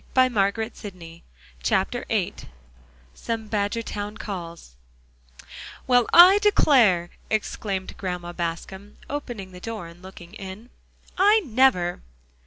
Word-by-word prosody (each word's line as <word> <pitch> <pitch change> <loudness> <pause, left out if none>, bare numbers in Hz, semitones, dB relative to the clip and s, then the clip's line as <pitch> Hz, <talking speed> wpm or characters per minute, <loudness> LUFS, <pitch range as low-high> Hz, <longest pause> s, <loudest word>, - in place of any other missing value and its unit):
Do 260 - +6
say 255 0 +3
yes, 205 +2 -1
Mrs. 165 -2 -13 0.5
Pepper!" - - 0
VIII - - 0 0.8
SOME 225 - -5
BADGERTOWN 210 0 -3
CALLS 170 - -8 1.1
"Well, 245 -2 +3
I 370 +4 +9
declare!" 235 - +4 0.2
exclaimed 200 -3 -3
Grandma 180 -2 -5
Bascom, 185 +4 -6
opening 240 -9 -6
the 180 - -11
door 220 -2 -6
and 170 +1 -13
looking 185 -1 -12
in, 205 +3 -9 0.5
"I 415 +3 +5
never!" 225 -9 +2
205 Hz, 110 wpm, -24 LUFS, 180-235 Hz, 1.1 s, I